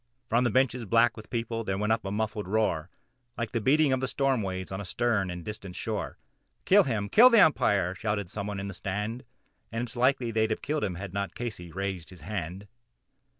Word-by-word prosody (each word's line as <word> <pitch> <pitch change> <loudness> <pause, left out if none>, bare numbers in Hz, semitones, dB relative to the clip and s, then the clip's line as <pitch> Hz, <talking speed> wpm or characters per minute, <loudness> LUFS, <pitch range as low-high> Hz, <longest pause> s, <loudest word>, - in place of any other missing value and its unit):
From 120 +2 +3
the 120 - +2
bleachers 125 +1 +2
black 115 +2 +4
with 110 -1 -11
people 115 -1 -2
there 95 -2 -2
rose 105 +1 -1
a 110 - +3
sullen 105 0 -3
roar, 95 -6 0 0.5
Like 115 -2 -3
the 115 - -1
beating 145 +4 +4
of 130 - 0
the 130 - 0
storm 135 -2 +1
waves 95 -1 -4
on 95 +1 -4
a - - -5
stern 110 -1 0
and 90 -1 -6
distant 100 -4 -7
shore, - - -4 0.5
"Kill 200 0 +6
him! 110 -6 -1
kill 240 - +8
the 230 -3 +6
Umpire!" 100 - +4
shouted 100 -1 -2
some 100 +3 -5
one 105 -1 -4
from 100 0 -4
the 100 - -5
stand 105 +7 -4 0.5
And 115 +1 -2
it's 120 0 -7
likely 125 -1 +2
they'd 110 0 +1
have 110 - -2
done 140 - -1
it - - -8
had 95 0 -7
not 100 0 -3
Casey 105 -8 -6
raised 95 -2 -4
his 90 -3 -13
hand. 95 +2 -5
110 Hz, 215 wpm, -28 LUFS, 95-120 Hz, 0.5 s, kill